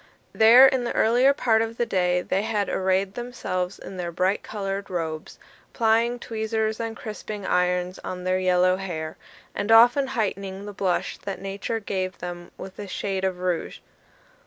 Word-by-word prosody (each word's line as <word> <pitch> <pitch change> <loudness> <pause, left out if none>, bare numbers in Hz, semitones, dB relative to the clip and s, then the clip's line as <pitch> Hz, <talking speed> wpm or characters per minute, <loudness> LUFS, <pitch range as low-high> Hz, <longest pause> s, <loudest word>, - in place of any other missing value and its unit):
There, 235 +4 +8
in 265 -2 +3
the 240 - -3
earlier 245 +5 +4
part 225 -5 +2
of 225 0 -3
the 240 - +1
day, 180 -3 +1
they 195 - 0
had 210 -2 -1
arrayed 190 +1 0
themselves 200 -7 -4
in 190 - -9
their 175 -1 -3
bright 185 +4 0
coloured 195 -1 -4
robes, 160 -3 -4 0.4
plying 230 +1 +2
tweezers 220 -1 -2
and 225 0 -4
crisping 210 -2 -7
irons 180 0 0
on 180 0 -6
their 185 0 +1
yellow 185 0 +3
hair, 160 -5 -5 0.4
and 215 - -2
often 245 +5 +6
heightening 195 -2 -2
the 205 - -7
blush 190 -2 -1
that 195 - -6
Nature 200 +3 -3
gave 190 -3 -3
them 175 0 -7
with 190 +1 -10
a 205 - -6
shade 195 0 -3
of 190 -1 0
rouge. 180 -2 -2
195 Hz, 165 wpm, -25 LUFS, 185-225 Hz, 0.4 s, There